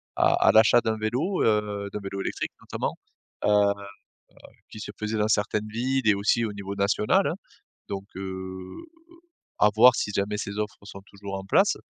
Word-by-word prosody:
à - - +4
à - - +8
l'achat 110 +2 +6
d'un 110 -2 -1
vélo, 125 - -1
heu, 105 -2 0
d'un 105 - -4
vélo 100 -1 -5
électrique - - -3
notamment, - - -4 0.5
heu - - +2
heu, 105 -1 +4 1.0
qui - - -10
se 105 -1 -7
faisait 105 +1 -2
dans 105 - +2
certaines 105 0 0
villes 125 +3 -1
et 105 - +6
aussi 105 +4 +1
au 110 - -3
niveau 100 -1 -6
national, 100 +2 +2
hein. - - 0 0.5
Donc, 95 -1 -4
heu, 95 - -7 0.7
à 105 - +6
voir 120 +3 +7
si 105 - -2
jamais 100 +1 -1
ces 100 0 -5
offres 105 -1 -3
sont 100 -1 -10
toujours 100 -1 -7
en 95 - -6
place 95 - +3
105 Hz, 180 wpm, -26 LUFS, 100-110 Hz, 1.0 s, à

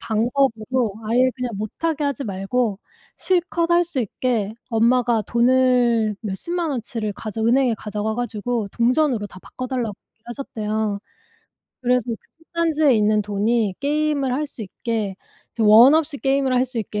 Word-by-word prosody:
방법으로 235 -1 0
아예 250 +3 +3
그냥 250 -1 -3
못하게 295 +9 -2
하지 280 -1 -2
말고 200 +2 -1 0.4
실컷 345 -2 0
할 345 0 +4
수 325 -6 -3
있게 220 -2 -1 0.2
엄마가 235 -1 +2
돈을 240 -2 +2
몇십만 325 - -3
원치를 230 -4 -3
가져 215 +2 -5
은행에 245 0 +3
가져가 210 +1 -3
가지고 235 -1 -2
동전으로 245 -2 +1
다 185 - -13
바꿔 255 +5 -7
달라고 240 -5 -2 0.2
얘기를 225 - -47
하셨대요. 215 -4 -3 0.8
그래서 250 -1 +2
그 225 - -2 0.3
솥단지에 315 -5 +2
있는 210 0 +3
돈이 210 0 0
게임을 290 -2 0
할 300 +3 -1
수 265 - -13
있게 215 0 -3 0.4
이제 230 - -1
원 225 +7 +8
없이 315 -2 0
게임을 270 -1 +1
할 250 0 +3
수 250 -1 -5
있게 210 -1 -3
240 Hz, 320 characters per minute, -22 LUFS, 215-270 Hz, 0.8 s, 원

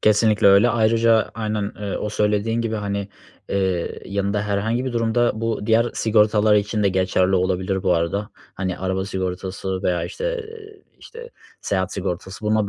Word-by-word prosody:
Kesinlikle 105 0 +4
öyle. 100 +5 +6
Ayrıca 115 0 +3
aynen, 105 -2 -2
eee, 100 -2 -3
o - - -3
söylediğin 105 +2 0
gibi, 115 -1 -2
hani, 100 -1 -3 0.4
eee, 95 -3 -1
yanında 100 +1 -1
herhangi 110 +5 -1
bir 130 - -3
durumda 120 +1 +1
bu 115 -2 -2
diğer 115 +1 +4
sigortalar 105 -1 +3
için 105 +1 +1
de 100 - +4
geçerli 95 0 +1
olabilir 95 +1 0
bu 90 - +3
arada. 95 +6 -1 0.2
Hani, 95 -2 -3
araba 95 0 -2
sigortası 95 0 -4
veya 90 -1 0
işte - - -3 0.5
işte, 475 +1 -11 0.3
seyahat 95 -2 -1
sigortası 95 +2 -5
buna 105 -1 +1
105 Hz, 150 wpm, -22 LUFS, 95-110 Hz, 0.5 s, öyle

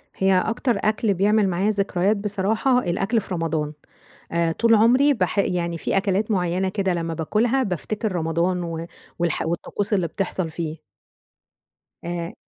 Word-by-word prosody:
هي 190 0 +2
أكتر 230 +2 0
أكل 215 0 +2
بيعمل 205 +1 +3
معايا 185 +4 +1
ذكريات 200 0 +1
بصراحة 210 +5 +1
الأكل 200 +2 0
في 190 - -7
رمضان. 160 -3 -1 0.6
آآ 170 -1 +1
طول 230 +5 +3
عمري 250 +7 +5
باح 220 -4 -1
يعني 170 -3 0
في - - -1
أكلات 195 +2 +1
معينة 185 -1 +1
كده 195 -2 0
لمّا 165 -1 -2
بآكلْها 225 - +1
بافتكر 210 +2 -2
رمضان، 170 +1 0
و 165 -1 -4 0.3
والح 170 -2 0
والطقوس 195 +5 -3
اللي 185 -4 +2
بتحصل 185 -1 -3
فيه. 160 -1 -4 1.3
آآ 170 0 -4
190 Hz, 145 wpm, -23 LUFS, 170-215 Hz, 1.3 s, عمري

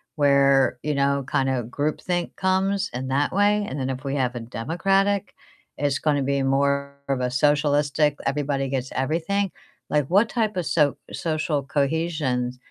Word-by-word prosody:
where, 140 -3 +4
you 150 -1 -1
know, 140 0 +1
kinda 130 -2 +1
groupthink 155 +7 -2
comes 195 +1 +1
in 130 +1 -3
that 140 +2 +1
way, 205 +1 +3
and 135 - -5
then 130 0 -2
if 130 +2 -6
we 140 +1 -2
have 130 -2 0
a - - -3
Democratic, 195 - 0 0.4
it's 145 -1 0
gonna 145 -3 +1
be 140 0 0
more 140 +1 +1
of 130 -2 0
a 125 - 0
socialistic 145 +1 +2
everybody 135 -1 -1
gets 130 -1 -3
everything? 170 +8 -1 0.4
Like, 150 -2 +2
what 205 +5 +4
type 215 -5 -1
of 175 - -1
so 150 -3 +2 0.2
social 155 -2 -1
cohesions 140 -4 -1
145 Hz, 155 wpm, -24 LUFS, 135-165 Hz, 0.4 s, where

